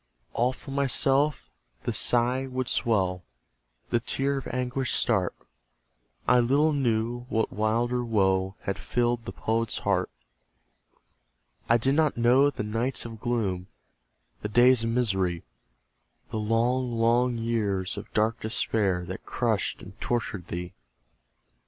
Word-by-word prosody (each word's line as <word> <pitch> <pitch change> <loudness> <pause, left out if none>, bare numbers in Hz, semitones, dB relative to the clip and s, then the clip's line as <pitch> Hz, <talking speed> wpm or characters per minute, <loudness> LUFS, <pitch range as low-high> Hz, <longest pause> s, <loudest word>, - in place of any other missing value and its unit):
All 125 +2 +2
for 135 - -10
myself 140 +1 +2 0.4
the - - -1
sigh 125 +2 +2
would 130 -1 -3
swell, 95 -6 +1 0.7
The 120 - +3
tear 135 +4 0
of 130 - -9
anguish 125 0 -2
start; 95 -7 +1 0.9
I 125 0 +5
little 140 +6 +3
knew 120 -2 -1
what 110 0 0
wilder 120 +3 0
woe 95 -4 +1
Had 100 - -3
filled 120 -1 0
the - - -5
Poet's 115 0 -1
heart. - - 0 1.6
I 115 - +6
did 130 +4 +1
not 155 -2 +2
know 125 +4 +5
the 130 - -4
nights 115 +5 -1
of 115 -2 -8
gloom, 105 -7 -1 0.7
The 105 - -3
days 120 +2 +5
of 115 - 0
misery; 95 -8 0 0.9
The 110 - -2
long, 120 +4 +1
long 120 +2 +2
years 105 -5 -1
of - - -8
dark 110 +1 +1
despair, 105 -5 0
That 95 +2 -7
crushed 115 -4 -1
and - - -13
tortured 105 -7 -2
thee. 90 +1 -5
115 Hz, 130 wpm, -27 LUFS, 105-125 Hz, 1.6 s, I